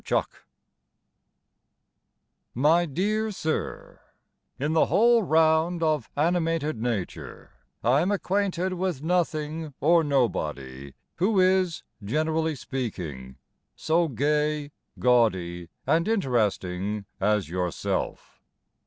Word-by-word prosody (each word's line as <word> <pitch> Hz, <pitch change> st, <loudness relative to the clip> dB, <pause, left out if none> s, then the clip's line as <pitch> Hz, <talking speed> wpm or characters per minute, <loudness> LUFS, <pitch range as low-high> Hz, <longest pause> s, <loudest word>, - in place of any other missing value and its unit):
TO -, -, +1 dB
A -, -, +3 dB
PUBLISHER -, -, -24 dB, 2.1 s
My 155 Hz, +7 st, +4 dB
dear 210 Hz, +8 st, 0 dB
Sir, 160 Hz, -6 st, -4 dB, 0.6 s
In 150 Hz, +3 st, 0 dB
the 160 Hz, -, +4 dB
whole 235 Hz, +2 st, +4 dB
round 160 Hz, 0 st, +2 dB
Of 155 Hz, -6 st, 0 dB
animated 165 Hz, -4 st, 0 dB
nature 115 Hz, -6 st, -4 dB, 0.3 s
I 125 Hz, +6 st, +4 dB
am 180 Hz, -, +1 dB
acquainted 190 Hz, -2 st, 0 dB
With 180 Hz, -5 st, -2 dB
nothing 160 Hz, -3 st, -1 dB
or 165 Hz, +3 st, +4 dB
nobody 70 Hz, -, -2 dB, 0.2 s
Who 195 Hz, +3 st, +2 dB
is, 185 Hz, -2 st, +2 dB, 0.2 s
generally 155 Hz, +7 st, 0 dB
speaking, 85 Hz, -, -5 dB, 0.4 s
So 165 Hz, +1 st, +1 dB
gay, 150 Hz, +2 st, 0 dB, 0.3 s
gaudy, 95 Hz, -9 st, +1 dB, 0.2 s
and 165 Hz, +3 st, +2 dB
interesting 105 Hz, -, 0 dB
As 105 Hz, -2 st, +1 dB
yourself. 90 Hz, +1 st, -3 dB
150 Hz, 100 wpm, -26 LUFS, 110-170 Hz, 2.1 s, My